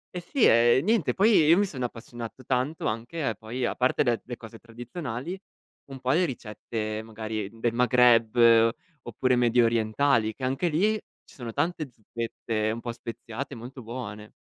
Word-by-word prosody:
E 180 - -3
sì, 250 - +1
ehm, 120 +3 +5
niente, 220 -6 +2
poi, 205 +3 +4
io 160 +3 +6
mi 205 - +3
sono 135 -9 -5
appassionato 120 +1 -8
tanto 130 +5 -1
anche 115 +9 -4
a 125 -6 0
poi, 120 +4 -4
a - - -1
parte 125 +1 +1
de 120 -3 0
le 120 -1 -7
cose 115 0 -11
tradizionali, 120 +7 -6 0.5
un 135 - -7
po' 130 0 0
le 170 +6 +3
ricette, 110 - -4
magari, 110 -2 -5
del 115 0 0
Maghreb, 120 -2 +4 0.7
oppure 125 +2 0
mediorientali, 115 0 +2
che, 130 - -5
anche 135 +7 0
lì, 190 +8 +2 0.3
ci - - -19
sono 120 -3 -6
tante 160 +3 -2
zuppette 115 -1 -3
un 115 - -4
po' 120 0 -5
speziate, 115 +2 -7
molto 125 +3 -9
buone. 110 -3 -7
120 Hz, 165 wpm, -27 LUFS, 115-135 Hz, 0.7 s, io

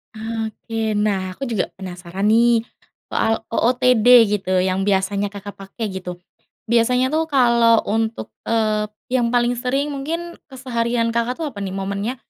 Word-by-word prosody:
Oke. 220 0 -3
Nah 195 -3 0
aku 275 - -7
juga 215 -5 0
penasaran 185 +1 -4
nih 230 0 +4 0.4
soal 225 0 0
OOTD 245 0 +2 0.2
gitu, 190 -2 0
yang 185 +1 0
biasanya 200 +1 +1
Kakak 205 0 -9
pakai 200 +3 -6
gitu. 180 -2 -6 0.5
Biasanya 250 +2 +3
tuh 315 +3 0
kalau 235 -3 +4
untuk, 220 - -1 0.2
eee, 215 -2 0 0.2
yang 245 -2 +1
paling 245 0 +2
sering 265 +4 -1
mungkin 330 +5 -4 0.2
keseharian 235 -3 -1
Kakak 240 +5 -1
tuh 320 - -2
apa 205 - -9
nih 190 - -4
momennya? 200 +5 -3
225 Hz, 140 wpm, -20 LUFS, 200-245 Hz, 0.5 s, nih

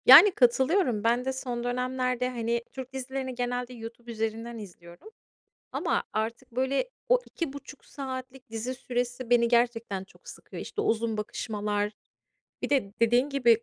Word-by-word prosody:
Yani, 410 - +11
katılıyorum. 260 - +3
Ben 240 +2 +2
de 265 - 0
son 245 -2 -3
dönemlerde, 250 0 0
hani, 235 -1 -1
Türk 260 -1 -7
dizilerini 265 0 -4
genelde 245 0 -2
YouTube 235 0 -8
üzerinden 225 +1 -3
izliyorum 175 - -11 0.6
ama - - +1
artık, 225 +2 -3
böyle, 265 - 0 0.2
o - - +6
2,5 285 -3 -6
saatlik 260 -2 -7
dizi 225 +3 -3
süresi 245 -1 -3
beni 235 -1 +5
gerçekten 230 -5 +1
çok 190 - -19
sıkıyor. - - -9
İşte, 425 - -4
uzun 225 - +1
bakışmalar 210 -1 -2 0.7
Bir - - -2
de 255 -9 +2
dediğin 240 +4 +4
gibi 235 -5 +4
245 Hz, 140 wpm, -28 LUFS, 230-260 Hz, 0.7 s, Yani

